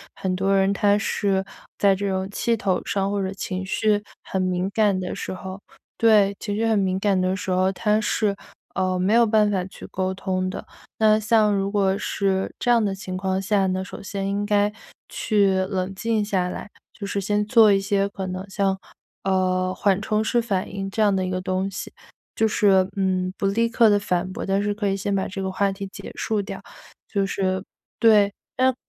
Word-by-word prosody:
很 190 -1 -2
多 195 +1 +2
人 195 0 +3
他 200 0 +3
是 200 -2 0 0.3
在 200 -1 +4
这 200 +1 -2
种 190 0 -2
气 230 +3 0
头 195 -4 0
上 195 0 -1
或 205 -1 -1
者 190 0 -2
情 190 -1 -4
绪 205 +2 +1 0.2
很 190 - -2
敏 185 0 0
感 210 -3 +3
的 185 -1 -3
时 - - -5
候 190 +1 -7 0.4
对， 210 -3 +5
情 205 -2 -3
绪 225 +2 0
很 220 -2 +2
敏 190 -1 0
感 195 -1 +1
的 185 +1 +1
时 190 - -5
候 185 +1 +2
他 210 +2 +1
是， 210 -1 0 0.4
嗯， 185 -1 0
没 195 +4 +2
有 235 0 +6
办 215 -1 +3
法 190 -3 0
去 190 - -11
沟 185 0 -2
通 185 -1 -2
的。 185 - -6 0.3
那 215 -1 +5
像 215 -1 +3
如 195 0 -1
果 195 -2 +2
是 195 -2 -1
这 - - -1
样 235 -2 +5
的 200 -2 0
情 190 -1 -6
况 190 0 -1
下 195 0 +1
呢， 185 0 -1
首 200 - -9
先 195 -1 -3
应 200 +1 -1
该 205 0 +2 0.3
去 200 -3 +1
冷 190 -1 -2
静 220 +1 0
下 185 -3 0
来， 185 - -7 0.2
就 200 - -7
是 200 0 -2
先 210 +1 0
做 220 -1 +6
一 195 - +4
些 200 0 0
可 195 -1 -5
能 185 +1 -5
像， 195 0 0 0.5
呃， 185 -1 +1
缓 195 0 +1
冲 215 0 0
式 235 +2 +1
反 205 -4 -2
应 195 0 -3
这 220 - -2
样 205 -2 +4
的 190 - 0
一 - - -3
个 185 0 -1
东 185 +1 -2
西， - - -7 0.4
就 225 - +2
是， 195 -3 +4
嗯， 185 -1 0
不 - - -2
立 230 +4 +2
刻 230 0 +4
地 205 - +4
反 185 -2 -1
驳， 230 - -5
但 195 0 +1
是 205 0 0
可 205 -1 -1
以 195 - 0
先 200 +1 -1
把 190 - 0
这 195 0 -5
个 190 - -2
话 200 +1 +1
题 195 0 -6
结 190 - -9
束 215 -2 -1
掉。 200 - -7 0.5
就 200 -2 0
是 190 -1 -1 0.4
对， 210 -3 +5 0.2
嗯 260 0 +3
195 Hz, 230 characters per minute, -23 LUFS, 190-210 Hz, 0.5 s, 有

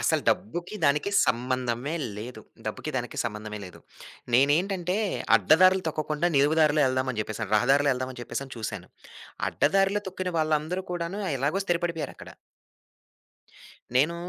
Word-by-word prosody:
అసలు - - +1
డబ్బుకి, 175 - -1
దానికి 150 +7 +2 0.2
సంబంధమే 125 +2 -1 0.2
లేదు. 115 +4 -7 0.3
డబ్బుకి - - -4
దానికి - - -4
సంబంధమే 105 -1 -5
లేదు. 90 - -12 0.5
నేనేంటంటే, 175 +7 +2 0.4
అడ్డదారులు 185 - +5
తొక్కకుండా 155 +2 -1
నిలువు 145 +3 +4
దారిలో 155 -1 +4
వెళ్దాం 130 0 0
అని 110 - -3
చెప్పేసని, 110 -1 -5
రహదారిలో 140 +5 +3
వెళ్దాం 130 0 -3
అని 125 - -10
చెప్పేసని 135 +2 -5
చూసాను. 110 -5 -5 0.6
అడ్డదారిలో 195 +1 +2
తొక్కిన 185 -1 -4
వాళ్ళందరూ 155 +3 0
కూడాను 175 +3 -3 0.2
ఎలాగో 145 +9 0
స్థిరపడిపోయారు 170 -2 -1
అక్కడ. - - -11 1.7
నేనూ 150 +6 +3
145 Hz, 125 wpm, -27 LUFS, 125-175 Hz, 1.7 s, అడ్డదారులు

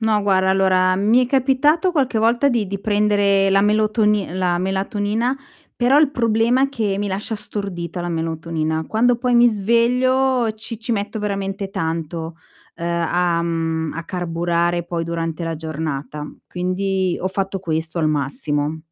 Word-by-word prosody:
No 220 -2 +2
guarda, 190 -2 +2
allora 185 -1 +3
mi 220 +6 +3
è - - -13
capitato 280 +7 +2
qualche 260 -8 0
volta 240 +5 +3
di 225 -6 0
di 200 0 -3
prendere 205 -1 +2
la 195 0 +4
melotoni 210 -2 +2
la 180 -1 0
melatonina, 205 +6 -1 0.4
però 255 +4 +3
il 300 -3 +4
problema 230 +1 +2
è 275 - +3
che 215 -7 -1
mi 205 - -2
lascia 200 +3 -3
stordita 185 -5 -5
la 175 - -3
melatonina. 160 -1 -2
Quando, 240 +2 +2
poi 245 0 0
mi 240 0 +6
sveglio 240 +3 +2
ci 220 0 -8
ci 235 +1 -3
metto 210 +1 -2
veramente 195 -1 -3
tanto, 165 -1 -4 0.4
uhm, 170 - -5 0.2
a 175 -1 +1
mhmm, 165 -1 -2
a 165 - -5
carburare 175 -1 -1
poi 170 -1 -3
durante 165 0 -3
la 165 -1 -3
giornata. 150 -2 -5 0.2
Quindi 185 0 -1
ho 185 - -2
fatto 195 0 -2
questo 160 -2 -3
al 155 - +2
massimo. 145 +1 -2
195 Hz, 155 wpm, -20 LUFS, 170-225 Hz, 0.4 s, mi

